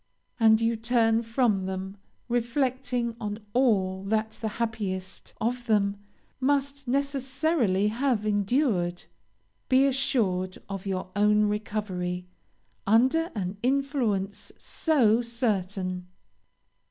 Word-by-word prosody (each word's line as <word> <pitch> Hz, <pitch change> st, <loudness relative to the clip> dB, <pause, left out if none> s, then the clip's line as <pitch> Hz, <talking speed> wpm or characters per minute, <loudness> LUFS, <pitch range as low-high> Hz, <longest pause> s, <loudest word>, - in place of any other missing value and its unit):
and 220 Hz, -1 st, +6 dB
you 230 Hz, 0 st, +2 dB
turn 225 Hz, 0 st, +2 dB
from 225 Hz, -5 st, +1 dB
them, 190 Hz, +1 st, -4 dB, 0.3 s
reflecting 245 Hz, 0 st, -1 dB
on 210 Hz, -1 st, -3 dB, 0.2 s
all 195 Hz, -7 st, +2 dB
that 220 Hz, +2 st, 0 dB
the 220 Hz, -, -5 dB
happiest 200 Hz, -5 st, -4 dB
of 245 Hz, +2 st, -2 dB
them 200 Hz, -2 st, +2 dB, 0.4 s
must 280 Hz, 0 st, 0 dB
necessarily 270 Hz, -, +1 dB
have 235 Hz, -1 st, 0 dB
endured. 205 Hz, -4 st, +1 dB, 0.6 s
Be 265 Hz, +1 st, +5 dB
assured 210 Hz, -9 st, +1 dB
of 195 Hz, 0 st, -6 dB
your 185 Hz, -1 st, -3 dB
own 210 Hz, +1 st, +4 dB
recovery, 200 Hz, -4 st, -2 dB, 0.6 s
under 260 Hz, -, +4 dB
an 190 Hz, -1 st, -3 dB
influence 245 Hz, -7 st, 0 dB
so 245 Hz, -8 st, +2 dB
certain. 195 Hz, -6 st, -2 dB
220 Hz, 100 wpm, -27 LUFS, 195-255 Hz, 0.6 s, and